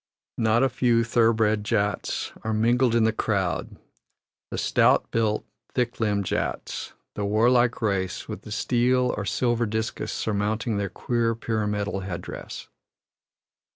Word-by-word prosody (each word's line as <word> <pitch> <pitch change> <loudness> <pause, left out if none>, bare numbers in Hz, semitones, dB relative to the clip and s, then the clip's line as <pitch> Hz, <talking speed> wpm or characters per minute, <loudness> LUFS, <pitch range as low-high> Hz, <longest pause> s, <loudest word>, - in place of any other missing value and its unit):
Not 115 +2 +3
a 135 - +3
few 120 -2 +2
thoroughbred 115 -2 +2
Jats 105 -1 -1
are 110 0 -1
mingled 120 +2 +3
in 115 - +4
the 110 0 +3
crowd 100 -5 -1 0.7
the - - -5
"stout - - +3
built, 110 -2 0 0.3
thick 125 -2 -1
limbed 105 -3 +1
Jats," - - -3 0.2
the 105 - -3
warlike 120 +4 +3
race 95 -4 -1
with - - -6
the 105 - -11
steel 125 +3 +2
or 105 - -4
silver 120 +1 +1
discus 110 +1 -3
surmounting 105 +1 -1
their 100 -1 -1
queer 115 +3 0
pyramidal 105 -3 -2
headdress. 90 -2 -7
110 Hz, 130 wpm, -25 LUFS, 105-120 Hz, 0.7 s, in